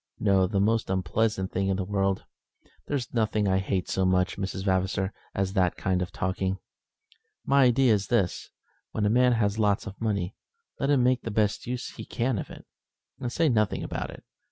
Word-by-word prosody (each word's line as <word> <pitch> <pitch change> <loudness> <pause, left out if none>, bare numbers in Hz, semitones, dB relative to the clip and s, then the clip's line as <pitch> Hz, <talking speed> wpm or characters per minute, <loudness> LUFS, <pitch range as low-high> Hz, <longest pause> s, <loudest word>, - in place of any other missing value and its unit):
"No, 95 -3 +3
the 100 +1 0
most 110 +2 +1
unpleasant 95 +2 0
thing 95 +1 0
in 95 -1 +1
the 95 - -1
world. 95 0 0 0.6
There's 135 -5 -3
nothing 110 -3 +1
I 95 0 +3
hate 95 -1 -1
so 95 - 0
much, 90 0 +2
Miss 95 -1 -3
Vavasor, 95 0 0 0.2
as 95 -1 -1
that 90 -3 +2
kind 95 -2 0
of 90 - -3
talking. 95 +1 -1 0.9
My 140 -1 +5
idea 125 -1 +4
is 100 -1 0
this, 100 -7 0 0.4
when 110 - 0
a 105 - +3
man 125 +1 +4
has 110 -2 +1
lots 105 -2 +2
of 95 - -9
money, 100 -4 -1 0.5
let 140 - 0
him 140 -4 +4
make 125 0 +3
the - - -5
best 105 0 0
use 125 0 -3
he - - -9
can 120 -2 -1
of - - -6
it, - - -11 0.5
and 120 - -3
say 165 +5 +2
nothing 110 -6 +1
about - - -4
it. - - -11
100 Hz, 195 wpm, -27 LUFS, 95-115 Hz, 0.9 s, My